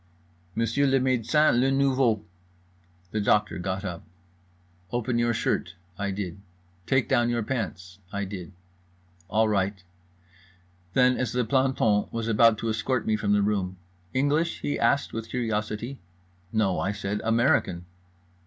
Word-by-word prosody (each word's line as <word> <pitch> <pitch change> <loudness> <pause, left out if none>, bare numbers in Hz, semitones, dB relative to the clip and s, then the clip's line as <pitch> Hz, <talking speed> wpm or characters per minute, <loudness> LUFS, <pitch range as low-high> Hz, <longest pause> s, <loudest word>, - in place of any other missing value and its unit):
"Monsieur 115 +5 +1
le 135 0 +3
médecin, 130 +1 +3
le 130 +2 +3
nouveau." 135 -6 +2 0.9
The 110 - -1
doctor 105 -1 +2
got 95 +2 -3
up. 85 -3 -5 0.9
"Open 120 0 0
your 120 0 +2
shirt." 115 -6 -1 0.2
I 100 +1 -2
did. 95 -2 -4 0.5
"Take 130 -1 +2
down 120 0 +2
your 120 -1 0
pants." 95 -6 -4
I 100 0 -2
did. 95 -2 -7 0.8
"All 110 +3 +3
right." 100 -2 0 1.1
Then, 125 0 +4
as 125 -3 -1
the 125 -1 +1
planton 130 -4 +2
was 115 -1 -3
about 115 0 +5
to 115 - -2
escort 115 +2 -1
me 110 - +2
from 105 -1 +1
the 105 -1 +3
room: 95 -3 -1 0.3
"English?" 145 +6 +1
he 145 - -2
asked 140 - +2
with 115 0 -5
curiosity. 110 +1 -2 0.5
"No" 105 -4 +1
I 100 - -1
said, 105 0 -3
"American." 115 -6 +2
110 Hz, 140 wpm, -26 LUFS, 100-125 Hz, 1.1 s, about